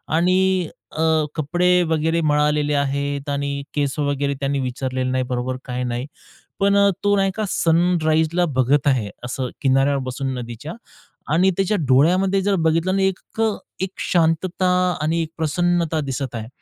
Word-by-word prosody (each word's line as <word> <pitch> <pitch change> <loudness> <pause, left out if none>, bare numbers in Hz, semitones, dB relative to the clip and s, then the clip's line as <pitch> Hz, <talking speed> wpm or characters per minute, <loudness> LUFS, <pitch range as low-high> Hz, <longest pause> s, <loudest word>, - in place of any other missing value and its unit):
आणि 185 +1 +2 0.3
अ, 160 - -2 0.3
कपडे 175 +4 0 0.2
वगैरे 160 +1 +1
मळालेले 150 -1 +1
आहेत, 140 0 -1
आणि 140 0 -2
केस 140 -2 -1
वगैरे 140 -1 0
त्याने 140 0 -1
विंचरलेले 130 0 -2
नाही 130 0 0
बरोबर 125 +1 -2
काही 125 0 -3
नाही, 125 +1 -3 0.5
पण 200 0 +3
अ, 200 0 +5
तो 205 0 +3
नाही 195 0 +2
का 215 -1 -1
सनराईजला 165 0 +2
बघत 135 +3 +2
आहे, 120 -7 +1 0.2
असं 125 0 -3
किनाऱ्यावर 135 0 +2
बसून 130 +1 -3
नदीच्या 120 +6 -7 0.6
आणि 185 +4 +4
त्याच्या 195 +2 +1
डोळ्यामध्ये 185 +9 +3
जर 200 0 +1
बघितलं 165 +4 +1
ना 195 - +1
एक 190 -1 0 0.2
अ, 225 - +4 0.3
एक 190 - -1 0.2
शांतता 175 +2 +1 0.3
आणि 165 +2 0
एक 155 - -7
प्रसन्नता 165 +1 0
दिसत 135 -3 -4
आहे. 110 -1 -5
150 Hz, 150 wpm, -21 LUFS, 135-175 Hz, 0.6 s, अ